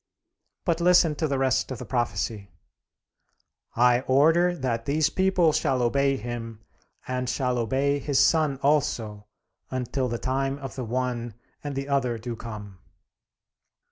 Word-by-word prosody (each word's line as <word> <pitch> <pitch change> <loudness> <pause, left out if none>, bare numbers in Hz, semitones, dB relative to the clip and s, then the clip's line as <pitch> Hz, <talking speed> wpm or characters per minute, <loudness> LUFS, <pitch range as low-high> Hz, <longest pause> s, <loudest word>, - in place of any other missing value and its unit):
But 170 -1 0
listen 175 -2 +5
to 155 - 0
the 140 -2 -1
rest 130 -1 +1
of 130 - -5
the 125 - -7
prophecy: 110 -4 -2 1.3
"I 120 +1 +4
order 165 +7 +4
that 120 -6 -2
these 155 +2 +2
people 185 -4 +2
shall 135 -4 +1
obey 135 +3 +2
him, 115 -1 -6 0.5
and 125 -1 -2
shall 125 -1 0
obey 135 +5 +1
his 140 0 0
son 155 -4 +3
also, 115 -8 0 0.4
until 130 +1 -2
the 120 -1 -2
time 135 +2 -1
of 135 -1 -7
the 130 - -5
one 120 -1 -3 0.3
and 145 -2 -4
the 135 +1 -3
other 130 -4 0
do 115 +1 -5
come." 105 -4 -9
130 Hz, 140 wpm, -26 LUFS, 120-140 Hz, 1.3 s, listen